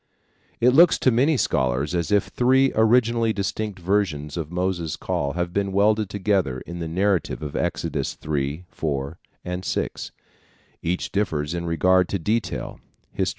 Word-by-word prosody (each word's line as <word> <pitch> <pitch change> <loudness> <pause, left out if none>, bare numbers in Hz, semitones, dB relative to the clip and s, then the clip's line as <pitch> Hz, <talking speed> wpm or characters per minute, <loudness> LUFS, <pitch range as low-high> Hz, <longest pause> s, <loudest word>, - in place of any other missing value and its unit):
It 125 +2 +5
looks 170 +5 +6
to 130 - +3
many 135 +6 +3
scholars 65 - 0
as 85 0 -1
if 105 -1 +4
three 130 +2 +3
originally 115 0 +3
distinct 105 0 -3
versions 85 -6 -1
of 80 -2 -4
Moses' 90 -3 -1
call 70 -1 -2
have 85 +1 -2
been 100 -1 0
welded 105 +1 +2
together 95 -10 0
in 85 0 -8
the 85 - -3
narrative 90 -1 0
of 75 -1 -5
Exodus - - -2
3, 75 +3 -3
4 70 -1 -4 0.3
and 90 +1 -4
6. - - -3 0.7
Each 90 +2 -2
differs 80 -7 -1
in 85 0 -3
regard 90 +3 +3
to 100 - 0
detail 105 +6 -2 0.3
(Hist. - - 0
90 Hz, 150 wpm, -23 LUFS, 80-105 Hz, 0.7 s, looks